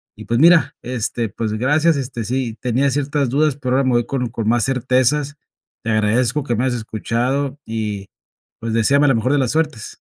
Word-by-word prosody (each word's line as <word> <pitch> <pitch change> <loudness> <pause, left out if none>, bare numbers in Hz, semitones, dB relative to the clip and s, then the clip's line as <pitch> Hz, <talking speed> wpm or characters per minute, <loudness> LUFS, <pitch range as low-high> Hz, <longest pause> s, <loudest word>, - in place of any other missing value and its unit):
Y - - -11
pues, 115 +1 0
mira, 170 +2 +5
este 120 -2 -2
pues, 110 +1 -3
gracias, 150 +8 +2
este, 125 -4 -4
sí 120 -1 -3
tenía 125 +3 +1
ciertas 140 -1 -1
dudas, 145 +1 +1
pero 130 -2 -1
ahora 135 - +2
me - - +2
voy 120 - +2
con 130 -3 -2
con 110 -1 -4
más 120 0 +2
certezas. 135 +3 +1 0.5
Te 115 - -1
agradezco 115 +6 +1
que 120 -4 -1
me 120 - -1
hayas 125 -2 0
escuchado. 125 +6 -2
Y, 105 -3 -4 0.5
pues, 115 -1 -4
deséame 140 +6 +3
la 135 - +4
mejor 120 +3 0
de - - +3
las 130 -3 +1
suertes. 155 -8 -2
125 Hz, 195 wpm, -19 LUFS, 115-140 Hz, 0.5 s, mira